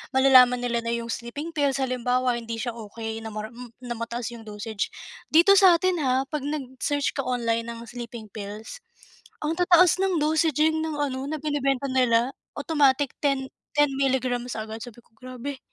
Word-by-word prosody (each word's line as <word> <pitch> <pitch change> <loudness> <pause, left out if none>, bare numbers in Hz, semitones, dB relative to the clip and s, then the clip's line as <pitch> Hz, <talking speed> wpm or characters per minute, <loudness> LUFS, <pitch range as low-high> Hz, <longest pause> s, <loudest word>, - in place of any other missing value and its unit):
malalaman 255 -2 +6
nila 240 -1 0
na 230 0 -2
'yong 235 0 -4
sleeping 285 +9 -5
pills 285 -4 +1
halimbawa 250 -2 0
hindi 230 0 -5
siya 235 +1 -3
okey 225 0 -6
na 220 -1 -8
mar 215 +1 -5
hmm, 240 +1 -12
na 245 - -6
mataas 235 +1 -4
'yong 225 -2 -11
dosage 210 0 -4 0.4
dito 360 +5 +6
sa 370 -3 +7
atin 360 0 +1
ha 260 -2 +1
'pag 290 +1 -5
nag-search 285 0 -2
ka - - -8
online 235 -3 -1
ng 235 0 -7
sleeping 235 -2 -8
pills 215 - -8 0.6
ang 310 +2 0
tataas 355 0 +5
ng 370 -5 +1
dosaging 315 0 +2
ng 320 -1 -3
ano 270 -1 -2
na 310 - -2
binebenta 275 -2 -1
nila 250 -1 +3 0.2
automatic 285 -3 +2
ten 275 -2 0 0.2
ten 295 -1 +4
milligrams 255 -2 0
agad, 220 0 -5
sabi 240 -1 -11
ko - - -33
grabe. 255 +2 -7
255 Hz, 170 wpm, -25 LUFS, 235-290 Hz, 0.6 s, sa